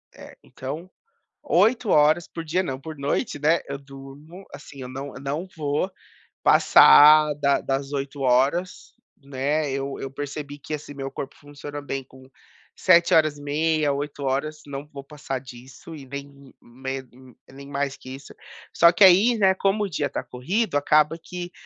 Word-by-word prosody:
É, - - -13
então. 150 +7 -8 0.5
8 230 - +2
horas 155 +3 +3
por 165 - -7
dia 170 +4 0
não, 135 -8 -4
por 155 +2 -8
noite, 140 +1 -2
né. 155 +4 +2
Eu 140 0 -5
durmo 140 +6 -13
assim, 140 -1 -11
eu 125 - -7
não 135 +2 -7
eu - - -10
não 145 +6 -4
vou 150 +4 -1 0.5
passar 150 - +7
da 140 -1 +1
das 135 +1 -3
8 140 0 -5
horas, 135 +8 0 0.3
né. 140 +2 -1
Eu 135 0 -4
eu 135 - -5
percebi 145 +1 -6
que, 145 +2 -8
assim, 150 -1 -6
meu 135 -1 -6
corpo 140 - -7
funciona 145 0 -9
bem 135 -1 -5
com 130 0 -18 0.4
7 170 -2 +4
horas 155 -2 +3
e - - -12
meia, 155 +1 0
8 145 0 -5
horas. 145 +3 -2
Não 140 0 -7
vou 140 -1 -9
passar 140 -2 -6
disso 130 +4 -13
e 145 -4 -10
nem 140 +1 -7 0.3
me 130 +2 -7 0.5
nem 140 +1 -12
mais 140 -1 -2
que - - -13
isso. 135 +1 -13 0.4
Só 170 0 +6
que 175 +4 +3
aí, 195 +6 +6
né, 190 -3 +4
como 195 +2 0
o 200 - -3
dia 145 -4 -2
tá - - -4
corrido, 180 - -2
acaba 150 +2 +2
que 175 +1 -7
145 Hz, 170 wpm, -24 LUFS, 135-160 Hz, 0.5 s, passar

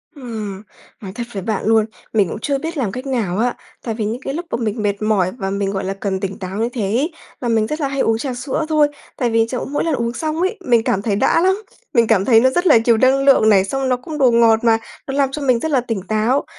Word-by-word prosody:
Ừm, 215 -7 -6 0.4
nói 195 -3 -7
thật 240 - -3
với 195 -2 -4
bạn 215 0 -2
luôn, 220 0 +4 0.3
mình 205 -5 +2
cũng - - -5
chưa 280 +4 -1
biết 325 +4 -5
làm 235 -8 -1
cách 255 +4 -6
nào 220 -9 -1
á. 240 +3 +1 0.3
Tại 230 - -2
vì 220 -2 -2
những 230 +4 -3
cái 270 - -4
lúc 340 +4 -4
mà - - 0
mình 220 0 -2
mệt 200 0 -1
mỏi 205 -4 +1
và 195 -5 -3
mình, 200 0 -1
gọi 195 -1 -3
là, 190 +1 -2
cần 195 -1 -3
tỉnh 195 0 -5
táo 185 +1 -5
như 230 +2 0
thế 240 - -3
ấy 235 - 0 0.3
là 245 - -2
mình 220 -1 +2
rất 305 +4 -4
là 280 - +1
hay 275 0 -4
uống 225 0 +2
trà 255 +2 -3
sữa 265 +5 -3
thôi. 305 -2 +4 0.3
Tại 245 - 0
vì 225 0 +3
chỗ 250 - -3
mỗi 290 +2 -2
lần 325 - 0
uống 235 -1 -2
xong 315 +3 -2
ấy, 380 +5 0
mình 235 -2 +3
cảm 195 - 0
thấy 205 -1 0
đã 270 +9 +2
lắm, 380 +4 +1 0.3
mình 235 -4 +4
cảm 200 -4 +3
thấy 230 -3 +6
nó 260 +3 +4
rất 350 +7 0
là 295 - +7
nhiều 235 -2 +4
năng 265 +3 +3
lượng 265 -6 +5
này, 195 -3 +5
xong 270 +5 -2
nó 250 - +2
cũng 300 +5 -7
đồ 260 -4 +4
ngọt 230 -1 +5
mà 225 -1 +4 0.3
nó 270 - -3
làm 275 -2 +2
cho 295 - -5
mình 255 -4 +2
rất 320 +5 -3
là 265 -3 +3
tỉnh 225 -5 -3
táo. 220 +6 +1
235 Hz, 285 wpm, -19 LUFS, 215-270 Hz, 0.4 s, là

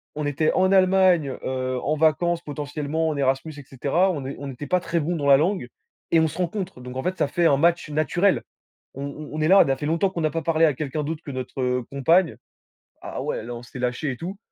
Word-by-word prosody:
on 150 - -3
était 145 +2 +1
en 185 +1 +3
Allemagne, 185 -6 +4
heu, 130 -1 -2
en 155 - 0
vacances 165 +2 +2
potentiellement 150 +1 -3
en 150 - -3
Erasmus 135 +3 0
et 145 - -9
cetera, 145 +9 +1
on 145 -5 -4
n'é 135 +1 -5
on 140 - -6
n'était 135 +2 -7
pas 180 +5 +2
très 170 -1 -1
bons 165 +3 -1
dans 145 -2 -2
la 140 -1 +8
langue 175 -3 0 0.4
et 165 - +5
on 160 - +3
se 155 +3 -8
rencontre. 185 -3 -3
Donc 125 0 -8
en 130 - -3
fait, 185 +1 -2
ça - - +1
fait 175 -1 0
un 140 -4 +5
match 170 +1 +2
naturel. 160 +6 +1 0.5
On 135 - -6
on 145 +1 -7
on 155 - -3
est 155 - +2
là, 195 +1 +7
ça 135 - +2
fait 145 - -5
longtemps 165 +5 +1
qu'on 175 -3 -4
n'a 155 -1 +1
pas 165 - -2
parlé 165 0 +2
à 150 - +3
quelqu'un 150 +2 -3
d'autre 155 +2 -4
que 140 - -5
notre 125 -1 -2
compagne 165 +5 +2 0.7
ah - - -5
ouais - - -2
là, 120 +1 -6
on 120 - -9
s'est 125 +2 -10
lâchés 125 +3 -1
et 125 - -6
tout. 185 +7 -6
155 Hz, 250 wpm, -24 LUFS, 135-170 Hz, 0.7 s, la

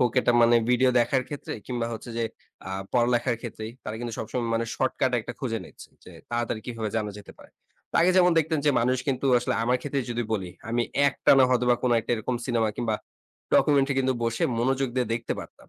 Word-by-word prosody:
হোক 120 -2 +3
এটা 120 - +2
মানে 120 0 +6
ভিডিও 125 +1 +4
দেখার 130 +2 +1
ক্ষেত্রে 145 - -6
কিংবা 120 -2 -2
হচ্ছে 115 +2 -7
যে 115 - +1 0.4
আ - - -5 0.2
পড়ালেখার 120 0 +2
ক্ষেত্রেই। 110 -2 -6
তারা 110 +1 -4
কিন্তু 120 -1 -4
সবসময় 115 +2 -3
মানে 115 0 0
শর্টকাট 130 0 0
একটা 120 +3 -7
খুঁজে 115 -5 -2
নিচ্ছে, - - -13 0.2
যে - - -12 0.2
তাড়াতাড়ি 120 -2 -2
কিভাবে 115 -3 -3
জানা 105 -1 -1
যেতে 105 - -12
পারে। - - -16 0.4
তো - - -23
আগে 175 +2 +5
যেমন 180 -1 +6
দেখতেন 160 0 +1
যে - - +6
মানুষ 125 +2 +2
কিন্তু 135 0 0
আসলে 120 - -1
আমার 125 +2 +2
ক্ষেত্রেই 140 -3 -3
যদি 120 0 -1
বলি, 95 -5 -2 0.2
আমি 120 +1 +1 0.3
একটানা 135 -1 +4
হয়তোবা 125 -1 +3
কোন 125 - +2
একটা 115 - -7
এরকম 120 +2 -2
সিনেমা 115 -3 +1
কিংবা 115 -3 -1 0.6
ডকুমেন্টারি 140 -1 +4
কিন্তু 130 0 +1
বসে 115 0 -1 0.2
মনোযোগ 135 +2 +1
দিয়ে 125 -2 +1
দেখতে 115 0 -3
পারতাম। - - -14
120 Hz, 205 wpm, -26 LUFS, 115-130 Hz, 0.6 s, মানে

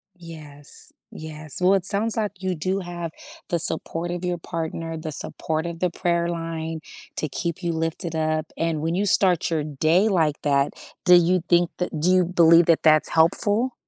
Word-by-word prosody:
Yes, 155 -5 -8 0.2
yes, 155 0 -7
well, 190 +2 +5
sounds 210 +4 +1
like 205 -3 -3
you 185 -1 -1
do 185 +5 -1
have 175 -2 -5 0.4
the 170 - 0
support 165 +1 -3
of 175 +1 -4
your 180 -1 -1
partner, 165 -1 -5
the 160 0 -5
support 155 +2 -3
of 170 -1 -5
the 180 0 +1
prayer 170 0 0
line 165 -1 -4 0.4
to 155 - -1
keep 170 +6 -3
you 170 - 0
lifted 165 +1 -2
up, 155 0 -1
and 165 -2 -1
when 165 +2 -1
you 200 - +1
start 185 -4 +3
your 160 -3 0
day 155 +7 +2
like 160 -7 +1
that, 140 -1 +1 0.3
do 180 -1 +8
you 175 0 +3
think 175 -1 +4
that 175 -4 -3
do 170 - +3
you 185 -1 +4
believe 170 -1 +5
that 165 -1 +3
that's 155 -1 +4
helpful? 205 +9 +2
165 Hz, 180 wpm, -23 LUFS, 160-180 Hz, 0.4 s, do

